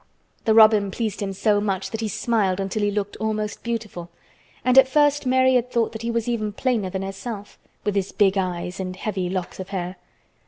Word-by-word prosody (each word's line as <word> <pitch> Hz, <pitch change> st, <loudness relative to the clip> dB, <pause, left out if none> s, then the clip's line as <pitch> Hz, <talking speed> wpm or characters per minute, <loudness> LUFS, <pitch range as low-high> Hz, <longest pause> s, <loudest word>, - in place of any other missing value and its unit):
The 220 Hz, -1 st, +4 dB
robin 215 Hz, -2 st, +6 dB
pleased 215 Hz, +1 st, -3 dB
him 200 Hz, -1 st, -2 dB
so 205 Hz, +1 st, +1 dB
much 195 Hz, -2 st, -2 dB
that 225 Hz, -, -4 dB
he 220 Hz, -, -1 dB
smiled 205 Hz, -3 st, 0 dB
until 195 Hz, +2 st, -2 dB
he 205 Hz, -, +2 dB
looked 205 Hz, 0 st, -3 dB
almost 215 Hz, -1 st, -2 dB
beautiful, 215 Hz, -7 st, -4 dB, 0.6 s
and 255 Hz, 0 st, +4 dB
at 265 Hz, -, +6 dB
first 290 Hz, 0 st, +2 dB
Mary 260 Hz, 0 st, +4 dB
had 250 Hz, -1 st, +2 dB
thought 235 Hz, -2 st, +1 dB
that 220 Hz, -, -7 dB
he 230 Hz, -, -3 dB
was 230 Hz, -1 st, -1 dB
even 215 Hz, -3 st, -1 dB
plainer 225 Hz, -4 st, 0 dB
than 190 Hz, +1 st, -3 dB
herself, 200 Hz, +2 st, -7 dB, 0.2 s
with 205 Hz, -, 0 dB
his 195 Hz, -1 st, -1 dB
big 195 Hz, -2 st, +3 dB
eyes 180 Hz, -1 st, -2 dB
and 185 Hz, -1 st, -4 dB
heavy 190 Hz, -2 st, -3 dB
locks 185 Hz, -1 st, -4 dB
of 190 Hz, -, -6 dB
hair. 185 Hz, -1 st, -4 dB
210 Hz, 205 wpm, -23 LUFS, 190-230 Hz, 0.6 s, robin